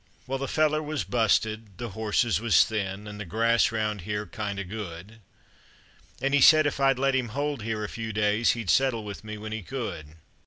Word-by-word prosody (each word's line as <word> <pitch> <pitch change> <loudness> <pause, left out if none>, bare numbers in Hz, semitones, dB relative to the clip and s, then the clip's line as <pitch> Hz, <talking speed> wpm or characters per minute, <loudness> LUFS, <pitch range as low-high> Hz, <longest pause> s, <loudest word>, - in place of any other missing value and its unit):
Well, 135 +1 -3
the 135 - -3
feller 155 +2 +2
was 150 -1 -3
busted, 110 -3 0
the 120 +2 -5
horses 110 +2 0
was 115 -2 +5
thin, 100 -1 -4
an' 105 0 -8
the - - -3
grass 115 +5 +2
round 105 -2 -2
here 105 +3 -3
kind 105 -3 -5
of 100 -2 -4
good, 100 +1 -8 1.0
An' 135 +1 -1
he 145 - +4
said 155 +3 +7
if 145 -1 -1
I'd 135 -1 +3
let 135 +1 +1
him 130 -2 0
hold 140 +3 -3
here 110 0 -3
a - - -2
few 110 +1 -5
days 105 +2 +2
he'd 115 -6 -1
settle 130 -5 +2
with 100 -1 -8
me 110 0 -7
when 110 +1 -7
he 110 0 -4
could. 95 - -6
110 Hz, 205 wpm, -27 LUFS, 105-130 Hz, 1.0 s, said